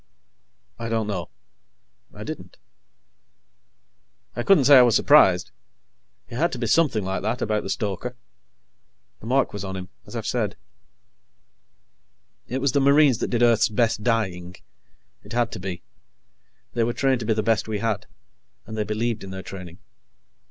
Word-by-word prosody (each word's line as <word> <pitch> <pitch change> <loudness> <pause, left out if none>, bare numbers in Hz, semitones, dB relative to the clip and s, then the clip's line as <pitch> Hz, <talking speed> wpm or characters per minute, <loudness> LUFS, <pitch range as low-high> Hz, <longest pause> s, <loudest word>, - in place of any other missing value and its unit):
"I 115 0 -4
don't 110 -1 0
know." 95 -5 -4 0.8
I - - -9
didn't. - - -8 1.8
I - - -2
couldn't 170 +2 +4
say 140 0 +8
I - - +9
was 120 -3 +4
surprised. - - +5 0.8
It 120 - -7
had 170 +5 +1
to - - -3
be 120 - -2
something 115 - +2
like 95 0 -2
that, 110 +4 -2
about 105 -1 0
the - - -7
stoker. 105 +5 -3 1.0
The 110 - -10
mark 135 +2 +1
was 105 -1 -5
on 95 -1 -5
him, 90 0 -7 0.2
as - - -10
I've - - -4
said. - - -1 1.9
It 130 +2 -3
was 140 -1 +2
the 140 - +2
Marines 140 -3 +5
that - - -2
did 120 -1 +1
Earth's 115 -2 +4
best 110 0 +1
dying. 95 -7 -1 0.7
It - - -11
had 120 -1 +1
to - - -6
be. 90 -1 -6 0.9
They 120 - +1
were 120 +1 0
trained 135 0 +1
to 110 - -5
be 110 - +3
the 110 - 0
best 115 0 +1
we 110 -1 -2
had, 105 -1 -2 0.6
and 110 - -8
they 110 - 0
believed 110 +1 -2
in 95 - -8
their 95 0 -7
training. 90 -3 -9
115 Hz, 165 wpm, -24 LUFS, 100-120 Hz, 1.9 s, I